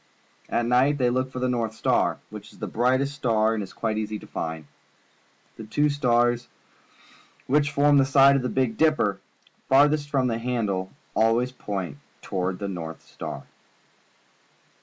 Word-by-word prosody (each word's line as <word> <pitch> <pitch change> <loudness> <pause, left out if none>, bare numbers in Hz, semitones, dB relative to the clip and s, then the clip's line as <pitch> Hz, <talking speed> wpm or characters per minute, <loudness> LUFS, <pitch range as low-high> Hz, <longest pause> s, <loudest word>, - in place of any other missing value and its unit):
At 120 - 0
night 130 +4 +3
they 125 -3 +2
look 130 +1 -1
for 130 - -8
the 125 - -1
A'o) 120 -3 0
//i 110 0 -16
&iar, - - +2
which - - -9
is - - -18
a - - -3
very - - -8 0.3
bright 140 +1 0
star 115 -6 +1
and 110 - -2
is 95 - -7
quite 110 -1 -2
easy 110 0 -3
to - - -12
find. 80 -1 -5 0.9
The - - -8
two 145 +7 +1
stars 120 -3 +1 1.0
which 145 +2 +2
form 145 0 +4
the - - +5
side 140 0 +6
of 135 - +1
the 125 - -2
Big 125 -4 0
Dipper 155 -11 +2 0.5
far 140 +2 +7
thest 145 -1 -2
from 135 -3 +1
the 115 -2 -1
handle 105 -6 -2 0.3
always 115 +3 +2
point 95 - -5 0.2
toward 90 0 -2
the 100 - -4
North 80 -4 -6
Star. - - -7
120 Hz, 175 wpm, -25 LUFS, 105-135 Hz, 1.0 s, far